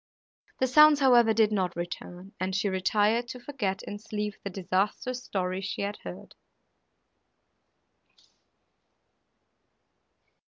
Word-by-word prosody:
The 260 - +3
sounds, 300 +3 +6
however, 240 -4 +5
did 220 -1 +3
not 185 -4 -1
return, 175 +2 -7
and 185 +1 -2
she 200 +1 0
retired, 210 +5 +1
to 250 - -7
forget 240 -8 -3
in 205 - -7
sleep 210 -1 -4
the 200 - -4
disastrous 200 +7 -2
story 185 -1 -2
she 200 +1 -4
had 205 +1 -3
heard. 90 0 -10
205 Hz, 110 wpm, -28 LUFS, 190-240 Hz, -, sounds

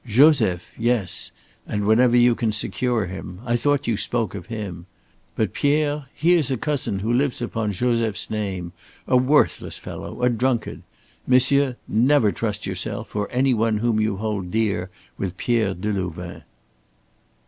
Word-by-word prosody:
Joseph 115 - +4
yes, 115 -6 0 0.4
and 105 0 -2
whenever 120 +3 +4
you 120 0 +5
can 115 -1 -1
secure 115 +1 -1
him. 90 0 -7
I 120 -1 +1
thought 145 +3 +1
you 115 -3 0
spoke 115 -2 -1
of - - -7
him. 100 -7 -6 0.5
But 110 -4 -1
Pierre, 145 -1 +1
he 170 +3 +3
is 160 -7 +2
a 130 - 0
cousin 130 -9 -1
who 115 - +1
lives 135 +1 +1
upon 115 -3 -2
Joseph's 115 0 0
name, 95 -5 -3 0.4
a - - +2
worthless 130 +4 +2
fellow, 125 - -7
a 125 - +5
drunkard. 120 0 -1 0.5
Monsieur, 130 +1 +4
never 120 -1 +3
trust 105 -2 -3
yourself - - -4
or 105 -1 -1
any 130 +1 +2
one 110 -1 +1
whom 115 0 +1
you 110 -2 0
hold 105 -3 -3
dear 100 -3 0 0.3
with 95 -2 -3
Pierre 110 -5 +1
Delouvain!" 90 -3 -4
115 Hz, 150 wpm, -23 LUFS, 100-125 Hz, 0.5 s, you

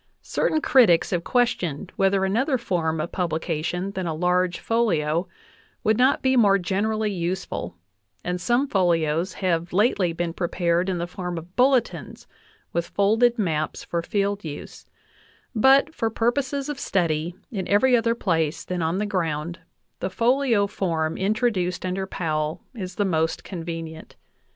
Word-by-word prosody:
Certain 310 - 0
critics 225 - +4
have 175 -2 0
questioned 185 - 0
whether 195 0 +2
another 255 +8 +1
form 165 -8 -1
of 160 - -3
publication 175 +1 -2
than 185 -2 -3
a 160 - -2
large 180 +1 +1
folio 175 -8 +1 0.6
would 220 - +3
not 260 +2 +3
be 260 0 +3
more 205 -5 +5
generally 210 +3 -1
useful, 175 - -3 0.5
and 180 0 -2
some 245 +6 +2
folios 170 - +1
have 175 -2 -1
lately 195 -2 +2
been 170 0 -3
prepared 175 +1 0
in 185 - -1
the 170 - -2
form 180 -1 -5
of 170 +3 -9
bulletins 255 -1 +1 0.5
with 170 0 -1
folded 225 +4 +3
maps 160 -7 -1
for 170 - -2
field 200 +2 -1
use; 150 -3 -8 0.7
but 270 +6 +5
for 225 - -1
purposes 265 +5 -1
of 295 -3 -4
study 170 -2 0 0.2
in 195 -5 -3
every 245 +5 +4
other 230 0 +2
place 165 -7 0
than 180 -1 -3
on 165 +3 0
the 210 - 0
ground 170 -4 -2 0.4
the - - -2
folio 235 0 +2
form 165 -5 -1
introduced 190 -3 0
under 190 +1 -2
Powell 155 -4 -2
is 185 -6 -6
the 205 - +1
most 160 -3 0
convenient. 165 -3 -7
185 Hz, 145 wpm, -24 LUFS, 170-220 Hz, 0.7 s, more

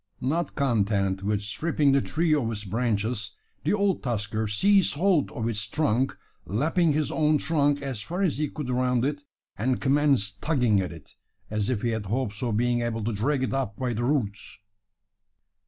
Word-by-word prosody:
Not 160 +7 -1
content 100 -7 +1
with 105 +1 -1
stripping 145 +6 +1
the 135 0 +4
tree 160 +3 +1
of 125 -7 +1
its 105 -2 -4
branches, 110 +1 -1 0.3
the - - +1
old 200 -2 +1
tusker 110 -3 -2
seized 195 - +3
hold 175 -1 +2
of 115 -1 -3
its 105 -2 -1
trunk 135 0 0 0.3
lapping 155 - +2
his 155 0 0
own 155 -1 +3
trunk 145 -2 +1
as 130 -6 -3
far 175 - -3
as 155 -7 0
he 150 -2 0
could 140 -4 -5
around 125 0 +1
it 145 0 -2 0.4
and 125 +3 +1
commenced 135 -8 +2
tugging 125 -10 +2
at 95 -2 -2
it, 80 -4 -13 0.4
as 105 0 -1
if 120 -5 -1
he 120 - +1
had 110 -3 -3
hopes 110 -1 -2
of 115 -4 0
being 120 +1 +1
able 115 -2 -2
to 115 +2 -1
drag 130 +6 0
it 130 - -1
up 130 -7 -2
by 125 -2 -1
the 115 +2 -2
roots. 120 -7 -1
125 Hz, 185 wpm, -26 LUFS, 105-145 Hz, 0.4 s, the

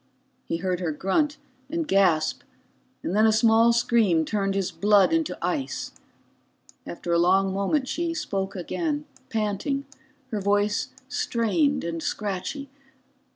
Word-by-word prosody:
He 165 - -2
heard 180 0 -1
her 175 -3 -1
grunt 240 - 0 0.3
and 330 0 -2
gasp, 180 -6 +2 0.6
and 180 - -2
then 215 +1 +5
a - - +5
small 225 +1 +5
scream 230 -8 +3
turned 195 +2 -1
his 195 -2 -1
blood 200 - +4
into 325 -2 0
ice. 280 -4 -2 1.0
After 170 0 -3
a 170 - +4
long 190 +2 +3
moment 230 +8 0
she 335 +3 -2
spoke 195 -9 -3
again, 295 - -2 0.2
panting, 225 +5 -1 0.5
her 210 -2 -2
voice 205 +5 +1 0.2
strained 280 +2 0
and 165 -1 -3
scratchy. 210 - -3
205 Hz, 130 wpm, -25 LUFS, 190-275 Hz, 1.0 s, then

